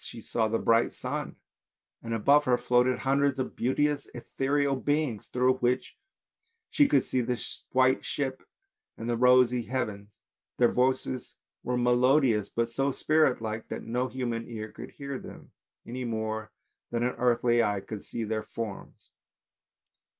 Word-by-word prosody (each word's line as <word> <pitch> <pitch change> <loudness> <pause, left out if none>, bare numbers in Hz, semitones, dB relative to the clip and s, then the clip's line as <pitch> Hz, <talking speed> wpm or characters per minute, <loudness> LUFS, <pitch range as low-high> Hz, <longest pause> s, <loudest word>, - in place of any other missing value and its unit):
She - - -8
saw 110 0 0
the 115 +1 0
bright 115 +1 +2
sun - - -4 0.7
and 115 - -7
above 140 +7 +4
her 125 -1 +3
floated 125 +1 +2
hundreds 140 0 +1
of 130 - -3
beauteous 145 +4 0
ethereal 135 +3 0
beings 145 -4 -1
through 130 +1 +2
which 125 +1 0 0.8
she 290 -2 +5
could 140 -3 +3
see 130 - 0
the 120 0 -2 0.3
white 130 0 +3
ship 135 -2 -3 0.6
and 115 - -6
the 120 - +1
rosy 125 0 +5
heavens, 105 -4 -3 0.5
their 120 -1 +4
voices 130 0 0 0.3
were 125 0 -1
melodious 125 -3 +3
but 115 0 0
so 135 +4 0
spirit 155 -3 +2
like 110 0 -4
that - - -5
no 125 +3 -1
human 120 -3 -3
ear 110 -2 -6
could - - -9
hear 140 -1 -6
them, - - -12 0.3
any 125 +2 -5
more 110 -2 -3 0.4
than 120 0 -1
an 125 - 0
earthly 120 -1 +3
eye 105 -3 +1
could 100 +1 -8
see 115 - -5
their 110 0 -2
forms. 110 -4 -8
125 Hz, 150 wpm, -28 LUFS, 115-130 Hz, 0.8 s, she